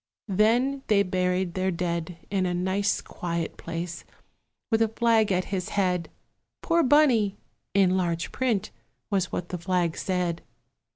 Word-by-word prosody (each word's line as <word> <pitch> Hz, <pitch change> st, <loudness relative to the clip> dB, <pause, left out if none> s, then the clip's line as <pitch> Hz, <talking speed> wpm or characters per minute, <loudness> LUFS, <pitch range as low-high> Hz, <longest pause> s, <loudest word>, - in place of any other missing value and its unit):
Then 245 Hz, +7 st, +3 dB
they 205 Hz, -2 st, +4 dB
buried 180 Hz, -1 st, 0 dB
their 185 Hz, +1 st, 0 dB
dead 170 Hz, -1 st, -2 dB
In 190 Hz, -2 st, +1 dB
a 180 Hz, -, -1 dB
nice 190 Hz, +3 st, 0 dB
quiet 170 Hz, -1 st, -4 dB
place, 170 Hz, +1 st, -5 dB, 0.7 s
with 225 Hz, 0 st, +3 dB
a 225 Hz, -, +5 dB
flag 225 Hz, -1 st, +2 dB
at 185 Hz, 0 st, +1 dB
his 185 Hz, -2 st, -2 dB
head; 180 Hz, -4 st, 0 dB, 0.5 s
"Poor 335 Hz, 0 st, +3 dB
Bunny!" 250 Hz, -9 st, +4 dB, 0.4 s
in 190 Hz, -2 st, +4 dB
large 170 Hz, -2 st, -1 dB
print 235 Hz, -7 st, 0 dB, 0.4 s
was 190 Hz, -2 st, 0 dB
what 175 Hz, -, -4 dB
the 180 Hz, -, -4 dB
flag 175 Hz, -2 st, 0 dB
said. 180 Hz, -3 st, -1 dB
185 Hz, 140 wpm, -26 LUFS, 175-215 Hz, 0.7 s, a